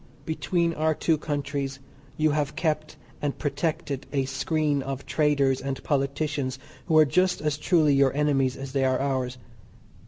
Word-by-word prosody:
Between 170 +1 0
our 155 0 +1
two 160 - +2
countries 140 -2 -3 0.4
you 155 0 +3
have 145 -1 -1
kept 155 -2 -1 0.2
and 145 -2 -2
protected 145 -2 -2
a 135 -2 +1
screen 145 +2 0
of 135 0 -5
traders 140 -3 +2
and 135 -1 -4
politicians 140 -1 -1 0.3
who 160 - +4
are 155 - +8
just 180 +5 +2
as 150 -1 0
truly 155 -1 +3
your 135 -1 +4
enemies 135 -3 +1
as 135 -1 -6
they 135 0 +1
are 130 -1 +2
ours. 130 -2 -1
145 Hz, 155 wpm, -26 LUFS, 135-155 Hz, 0.4 s, are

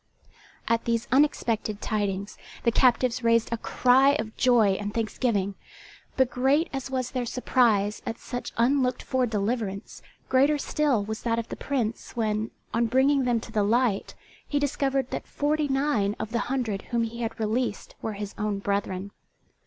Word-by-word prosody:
At 230 0 +1
these 230 -1 0
unexpected 230 -6 +1
tidings 205 -2 -2 0.3
the 235 - +3
captives 250 0 +3
raised 230 0 +3
a - - 0
cry 260 +4 +4
of 220 -4 -3
joy 240 -5 +4
and 205 0 -3
thanksgiving; 215 -2 -1 0.6
but 260 -1 +3
great 275 +6 +2
as 270 -1 -4
was 255 -2 -2
their 250 -2 -2
surprise 225 -5 +2
at 230 - -4
such 245 0 -6
unlooked 255 +2 +2
for 255 -1 0
deliverance, 210 -1 -3 0.3
greater 275 +3 +4
still 285 -6 +1
was 220 +1 -5
that 230 -1 0
of 230 - -3
the - - -4
Prince 235 -5 -3
when, 220 -1 -1 0.2
on 230 0 +2
bringing 265 +3 +3
them 240 -2 +2
to - - -10
the 210 - +1
light, 220 0 +1 0.3
he 290 - -1
discovered 275 -2 0
that - - -4
forty 295 +1 0
nine 270 -7 +1
of 220 - -4
the 235 - 0
hundred 235 -7 -1
whom 235 -1 +1
he 230 +1 -5
had 230 0 -4
released 220 +1 -2
were 220 - -3
his 205 0 -6
own 210 -1 -1
brethren. 200 -1 -2
235 Hz, 165 wpm, -26 LUFS, 215-260 Hz, 0.6 s, cry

